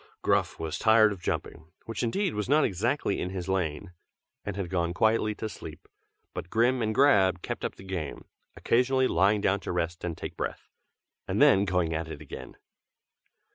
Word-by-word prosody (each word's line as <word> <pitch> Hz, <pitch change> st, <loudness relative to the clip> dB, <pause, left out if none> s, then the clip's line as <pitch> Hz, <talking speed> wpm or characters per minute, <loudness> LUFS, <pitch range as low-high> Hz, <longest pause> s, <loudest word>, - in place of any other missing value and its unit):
Gruff -, -, +1 dB
was 80 Hz, -1 st, -3 dB
tired 110 Hz, -1 st, +5 dB
of 95 Hz, -4 st, -7 dB
jumping, 80 Hz, -2 st, -4 dB, 0.2 s
which 115 Hz, -2 st, -4 dB
indeed 175 Hz, -, 0 dB
was 105 Hz, +3 st, -3 dB
not 150 Hz, +1 st, +5 dB
exactly 110 Hz, +4 st, 0 dB
in 90 Hz, -, -2 dB
his 95 Hz, -1 st, -5 dB
line; 90 Hz, -2 st, -2 dB, 0.5 s
and 100 Hz, -, -4 dB
had 100 Hz, -3 st, -3 dB
gone 85 Hz, -1 st, -1 dB
quietly 110 Hz, 0 st, +2 dB
to 110 Hz, -, -4 dB
sleep; 110 Hz, -, -10 dB, 0.5 s
but 85 Hz, -, -6 dB
Grim 120 Hz, +4 st, +2 dB
and 110 Hz, -1 st, -1 dB
Grab 95 Hz, -10 st, +4 dB
kept -, -, -4 dB
up -, -, -3 dB
the -, -, -13 dB
game, 90 Hz, -7 st, -5 dB, 0.3 s
occasionally 130 Hz, +2 st, +2 dB
lying 100 Hz, +3 st, +3 dB
down 100 Hz, 0 st, +2 dB
to -, -, -5 dB
rest 85 Hz, -1 st, -2 dB
and 85 Hz, -2 st, -3 dB
take -, -, -6 dB
breath, -, -, -5 dB, 0.6 s
and -, -, -1 dB
then 95 Hz, +1 st, +6 dB
going 90 Hz, -4 st, 0 dB
at 80 Hz, +1 st, -2 dB
it 80 Hz, -2 st, -7 dB
again. 75 Hz, -, -10 dB
95 Hz, 180 wpm, -28 LUFS, 85-110 Hz, 0.6 s, then